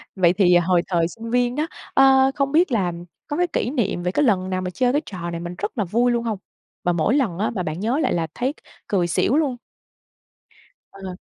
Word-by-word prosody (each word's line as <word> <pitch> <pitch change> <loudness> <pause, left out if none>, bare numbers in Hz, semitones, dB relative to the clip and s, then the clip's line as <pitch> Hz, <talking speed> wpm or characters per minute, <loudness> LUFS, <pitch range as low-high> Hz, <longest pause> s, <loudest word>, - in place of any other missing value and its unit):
Vậy 175 -2 +4
thì 180 -2 +4
hồi 175 0 +2
thời 170 -3 +1
sinh 225 +6 -9
viên 245 +1 +1
đó, 305 +2 -1 0.3
ơ, 270 0 +5
không 275 -1 0
biết 325 +1 +3
là 195 -7 +1 0.4
có 295 +1 -3
cái 355 - +2
kỷ 285 - -1
niệm 215 -9 -1
về 180 - 0
cái 295 - +1
lần 190 -5 +1
nào 185 0 -1
mà 185 - -3
chơi 245 +8 +1
cái 290 +3 +1
trò 175 -3 -6
này 170 - -4
mình 175 +1 -6
rất 205 - -4
là 215 - +1
vui 235 +7 +2
luôn 235 -1 0
hông? 225 -3 -2 0.5
Mà 175 - +2
mỗi 170 - +1
lần 230 -12 0
á, 215 - +1
mà 185 - -1
bạn 155 0 -4
nhớ 235 +8 0
lại - - +1
là 165 -2 -1
thấy 260 +4 -1
c - - -42 0.3
cười 185 -4 +1
xỉu 195 - +1
luôn. 280 -6 0 1.4
Ờ. 190 -2 -8
210 Hz, 240 wpm, -22 LUFS, 180-260 Hz, 1.4 s, ơ